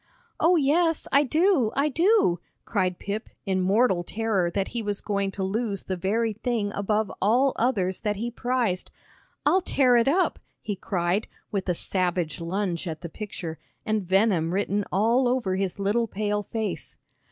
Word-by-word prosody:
"Oh, 355 +2 +5
yes, 325 +2 +2
I 280 - +6
do, 305 - +2
I 280 +2 +2
do," 330 - +3 0.3
cried 185 -4 0
Pip, 205 +3 -4 0.2
in 190 -2 0
mortal 190 -1 +3
terror 205 -3 0
that 195 +2 -2
he 235 - -3
was 205 -2 -2
going 200 -1 -1
to 195 - -3
lose 205 0 -2
the 190 - -3
very 215 +5 0
thing 220 -1 -1
above 210 +1 0
all 245 +7 +3
others 195 -7 0
that 210 -1 0
he 235 +4 -3
prized. 240 -6 -1 0.6
"I'll 380 - +4
tear 260 -7 +3
it 235 - +3
up," 355 +7 +2 0.2
he 205 - -4
cried, 185 +2 -1 0.2
with 195 -3 -2
a 180 - +2
savage 180 -3 -1
lunge 180 0 -2
at 160 -2 -5
the 170 - -6
picture, 175 -4 -6 0.3
and 215 -2 +1
venom 185 -3 +2
written 205 0 0
all 230 +6 +3
over 245 -7 0
his 190 0 -2
little 210 +4 +1
pale 210 0 -1
face. 220 +1 -4
205 Hz, 165 wpm, -26 LUFS, 190-240 Hz, 0.6 s, I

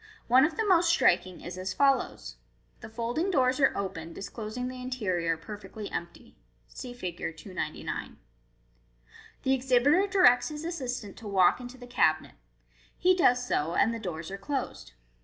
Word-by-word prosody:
One 255 +3 +6
of 310 0 -3
the 445 - +1
most 350 -4 +4
striking 185 - +2
is 180 +1 -7
as 185 +1 -4
follows: 275 -1 +1 0.2
— - - -37
The - - -9
folding 240 - -2
doors 260 -6 +2
are 270 - +3
opened, 170 -4 -5
disclosing 220 +4 -5
the 255 0 -7
interior 185 -10 -1
perfectly 210 +4 -8
empty. 170 0 -7 0.3
(See 250 - -8
Fig. 185 -8 -6 0.2
299.) 155 -1 -5 1.3
The 265 - +2
exhibitor 265 +8 +3
directs 360 -11 +5
his 300 +1 -6
assistant 255 - -4
to 220 - -9
walk 190 0 +4
into 245 +1 -9
the 250 - -11
cabinet. 245 - +1 0.6
He 370 +1 +4
does 250 -8 +3
so, 165 -3 0
and 230 - +3
the 230 - -4
doors 170 -4 -6
are 195 - -6
closed. 265 - -4
245 Hz, 160 wpm, -28 LUFS, 185-270 Hz, 1.3 s, One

